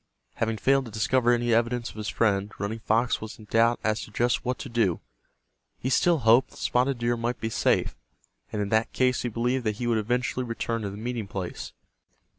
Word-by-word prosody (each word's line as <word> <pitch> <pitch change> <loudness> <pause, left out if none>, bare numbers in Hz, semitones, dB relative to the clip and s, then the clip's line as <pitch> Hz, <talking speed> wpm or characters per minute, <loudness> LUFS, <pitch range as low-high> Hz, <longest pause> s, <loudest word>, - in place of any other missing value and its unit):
Having 115 -1 0
failed 135 +6 +2
to 115 - -9
discover 120 +3 +2
any 120 -1 +2
evidence 120 +1 +1
of - - -18
his 110 -1 -5
friend, 105 -2 +1
Running 105 +3 -3
Fox 115 +3 +1
was 110 0 -7
in 110 - -13
doubt 115 +3 +3
as 110 0 0
to - - -8
just 120 +4 0
what 125 +1 -1
to - - -7
do. 115 -7 +1 0.8
He 130 - -3
still 175 +4 +4
hoped 120 0 +4
that - - -17
Spotted 125 +2 +1
Deer 120 0 0
might 120 +1 -2
be 110 - -3
safe, - - +1 0.6
and 105 -1 -1
in 100 - -4
that 110 +1 +1
case 125 -1 +2
he 120 - -2
believed 120 +3 -1
that 105 -1 0
he 120 - -4
would 115 -2 +2
eventually 125 +3 -1
return 115 -1 -3
to 100 - -3
the 100 - -8
meeting 115 -1 -4
place. 95 -3 -6
115 Hz, 215 wpm, -26 LUFS, 110-125 Hz, 0.8 s, still